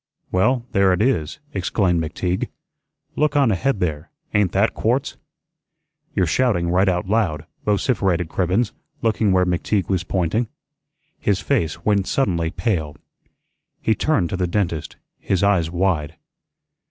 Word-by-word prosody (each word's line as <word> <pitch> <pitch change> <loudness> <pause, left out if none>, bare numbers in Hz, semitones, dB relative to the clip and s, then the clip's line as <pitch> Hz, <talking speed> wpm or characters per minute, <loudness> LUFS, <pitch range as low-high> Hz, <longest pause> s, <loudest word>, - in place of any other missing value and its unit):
"Well, 120 +6 +2
there 100 -1 +4
it 90 - 0
is," 85 - 0 0.2
exclaimed 95 -3 +1
McTeague. 90 +3 -2 0.7
"Look 150 -1 +1
on 140 -5 +4
ahead 110 +4 0
there; 75 -5 -2 0.2
ain't 105 -4 +3
that - - +2
quartz?" - - 0 1.0
"You're 95 - +3
shouting 85 -3 +1
right 95 +2 +3
out 90 0 -1
loud," 95 -8 0 0.2
vociferated 95 -5 +1
Cribbens, 95 +7 0 0.3
looking 110 -2 +2
where 90 -1 +4
McTeague 90 +1 0
was 95 -4 +1
pointing. 95 +7 0 0.7
His 100 -2 +1
face 110 - -1
went 100 -3 +2
suddenly 85 -11 +1
pale. 80 -7 -2 0.8
He 110 - +2
turned 110 - +1
to 95 - -1
the 90 -1 0
dentist, 85 -4 -2 0.2
his 95 0 0
eyes 95 -5 +3
wide. 85 -4 0
95 Hz, 135 wpm, -21 LUFS, 85-105 Hz, 1.0 s, there